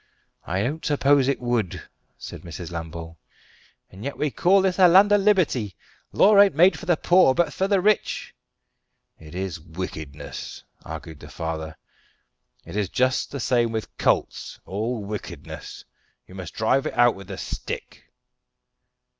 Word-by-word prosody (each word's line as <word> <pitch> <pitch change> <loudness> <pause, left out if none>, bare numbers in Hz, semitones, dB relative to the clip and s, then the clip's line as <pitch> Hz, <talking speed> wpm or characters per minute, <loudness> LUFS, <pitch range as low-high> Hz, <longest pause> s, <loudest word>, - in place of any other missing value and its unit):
"I 95 +3 0
don't 150 +7 -3
suppose 140 -2 +3
it 140 - +1
would," 120 -7 -1 0.4
said - - -9
Mrs. 85 0 -8
Lambole. 80 -1 -7 0.7
"And 95 +3 -11
yet 140 +2 -4
we 150 -1 -1
call 190 +6 +3
this 190 0 0
a 185 - +8
land 195 +4 +6
of 205 -1 +5
liberty! 165 - +2 0.4
Law 205 0 +5
ain't 200 -5 +4
made 175 +2 +5
for 195 - -10
the 175 -3 +3
poor, 175 -7 +4
but 175 - +1
for 190 - 0
the 200 -1 +3
rich." 210 +3 0 0.9
"It 80 +1 -12
is 95 -2 -4
wickedness," 80 -3 -7 0.2
argued 80 -3 -8
the - - -12
father. 80 -1 -5 0.9
"It - - -9
is 105 -3 -1
just 130 0 +1
the 140 - -6
same 120 +1 +1
with 110 -1 -5
colts - - 0
all 110 +3 -3
wickedness. 85 -7 -8 0.4
You - - -16
must 90 -3 -8
drive 115 +5 +1
it - - -5
out 120 -1 +5
with 95 -1 -12
the 95 -1 -7
stick." - - -6
115 Hz, 155 wpm, -24 LUFS, -, 0.9 s, a